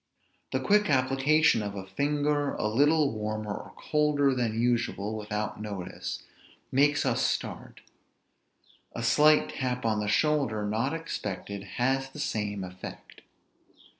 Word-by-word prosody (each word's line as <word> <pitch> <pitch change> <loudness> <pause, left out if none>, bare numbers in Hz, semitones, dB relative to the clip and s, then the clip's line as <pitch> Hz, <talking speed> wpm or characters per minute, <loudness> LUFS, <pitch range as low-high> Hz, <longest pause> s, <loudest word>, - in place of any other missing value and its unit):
The - - 0
quick 210 -2 +3
application 135 +1 +3
of 100 -1 -4
a 95 -1 -6
finger 145 +6 0
a - - -2
little 145 +5 +3
warmer 110 -1 -3
or - - -9
colder 150 -2 +2
than 115 -3 -1
usual, 115 -3 0
without 105 0 -4
notice, 100 -4 -5 0.5
makes 145 +2 +3
us - - +1
start; - - -3 1.1
a 115 - -4
slight 150 +5 +5
tap 125 -2 -3
on 110 -1 +1
the 105 - -2
shoulder, 120 -4 +1
not 115 +8 0
expected, 100 - -5
has 135 +2 +1
the 150 - -11
same 105 -8 -2
effect. 90 0 -10
125 Hz, 130 wpm, -28 LUFS, 105-145 Hz, 1.1 s, slight